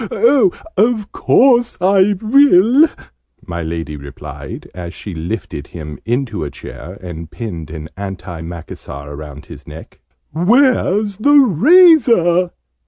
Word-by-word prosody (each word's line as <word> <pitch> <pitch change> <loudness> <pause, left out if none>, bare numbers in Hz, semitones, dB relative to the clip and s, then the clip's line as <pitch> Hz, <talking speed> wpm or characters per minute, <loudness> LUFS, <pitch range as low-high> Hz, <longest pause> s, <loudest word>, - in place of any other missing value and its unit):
Of 220 -2 +1
course 245 -2 +3
I 190 +2 +3
will!" 255 - +5 0.6
my 85 0 -5
Lady 80 -1 -5
replied, 70 -1 -9
as 85 -1 -8
she 100 - -8
lifted 85 -3 -6
him 75 -3 -9
into 120 - -2
a 75 - -4
chair, 90 +5 -11
and 85 -3 -8
pinned 85 -9 -7
an 80 -1 -8
anti 90 -4 -7
macassar 80 -4 -9
round 75 0 -10
his - - -13
neck. - - -12 0.3
"Where's 210 - +2
the 290 +7 +4
razor?" 235 - +5
115 Hz, 115 wpm, -16 LUFS, -, 0.6 s, will